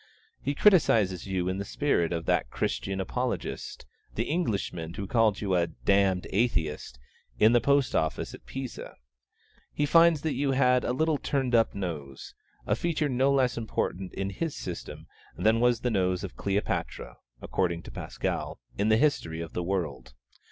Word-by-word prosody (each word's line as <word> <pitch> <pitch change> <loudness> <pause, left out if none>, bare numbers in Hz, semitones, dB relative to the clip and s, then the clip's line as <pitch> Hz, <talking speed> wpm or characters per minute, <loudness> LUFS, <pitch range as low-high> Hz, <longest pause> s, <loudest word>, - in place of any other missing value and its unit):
He 140 +1 -2
criticises 110 - +4
you 95 -2 -1
in 95 +1 -1
the - - -2
spirit 100 - 0
of 85 -1 -2
that 60 - +1
Christian 95 +8 -2
Apologist, 125 +6 -3 0.3
the 115 - 0
Englishman 100 - -2
who 100 - -4
called 110 -1 +2
you 100 -3 -1
'a 85 -1 +2
damned 95 +2 +1
Atheist' 80 - -1 0.4
in 110 +1 +6
the 120 - +5
post 140 +1 +2
office 80 0 -1
at - - -13
Pisa. 135 -2 -7 0.8
He 145 - 0
finds 165 0 +5
that 160 - 0
you 140 -1 0
had 125 -1 +3
'a - - 0
little 155 +3 +1
turned 135 -3 -1
up 115 -3 +3
nose,' 75 -9 -6 0.3
a - - +1
feature 160 -3 -1
no 130 +2 +2
less 130 -3 +2
important 95 -4 -3
in 95 0 -2
his 155 - -3
system 90 -2 -7 0.3
than 110 +1 +3
was 120 -1 +3
the 125 - 0
nose 95 -2 +1
of 95 - -6
Cleopatra 100 +1 -2 0.2
(according 85 +1 -1
to - - -10
Pascal) - - -4 0.2
in 105 +2 +2
the 110 - +5
history 115 - +1
of 85 -1 -6
the - - -2
world. 75 -10 -3
105 Hz, 165 wpm, -28 LUFS, 90-130 Hz, 0.8 s, in